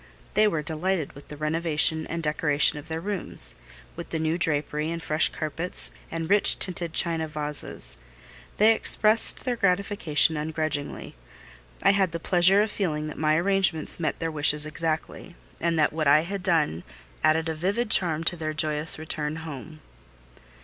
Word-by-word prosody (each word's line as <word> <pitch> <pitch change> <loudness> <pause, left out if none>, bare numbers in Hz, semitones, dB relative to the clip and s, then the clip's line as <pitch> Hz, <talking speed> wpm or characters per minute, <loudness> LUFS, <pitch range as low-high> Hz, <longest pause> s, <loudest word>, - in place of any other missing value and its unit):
They 215 +1 +4
were 165 -7 -2
delighted 160 +1 -2
with 140 - -14
the 150 - -10
renovation 160 0 +1
and 170 0 -5
decorations 150 -1 +1
of 150 - -13
their 160 0 -4
rooms; 175 - -2 0.4
with - - -8
the 165 - -3
new 160 +1 -1
drapery, 150 -2 0
and 170 0 -4
fresh 155 -1 +1
carpets, 165 +3 -2 0.2
and 165 0 -4
rich 205 +2 +6
tinted 175 -3 +1
china 165 -2 +1
vases: 150 - -4 0.6
they 220 +2 +5
expressed 220 0 +3
their 250 -2 -1
gratification 180 -6 +2
ungrudgingly. 155 -1 -4 0.7
I - - +5
had 190 -4 0
the 170 - -3
pleasure 185 +4 +4
of 215 - -4
feeling 155 -8 -2
that - - -9
my 155 0 +2
arrangements 180 -2 +2
met 155 -4 -2
their 165 -1 -3
wishes 150 0 +2
exactly, 160 +1 -5 0.2
and 170 0 -1
that 150 -1 +2
what 155 -1 -1
I 145 +2 +5
had 195 +4 -5
done 160 - 0 0.4
added 160 +1 +2
a 160 - -2
vivid 200 +8 -2
charm 165 -3 +3
to 175 - +1
their 155 -2 -5
joyous 150 0 +1
return 155 -1 -4
home. 155 +1 -9
160 Hz, 165 wpm, -25 LUFS, 150-175 Hz, 0.7 s, rich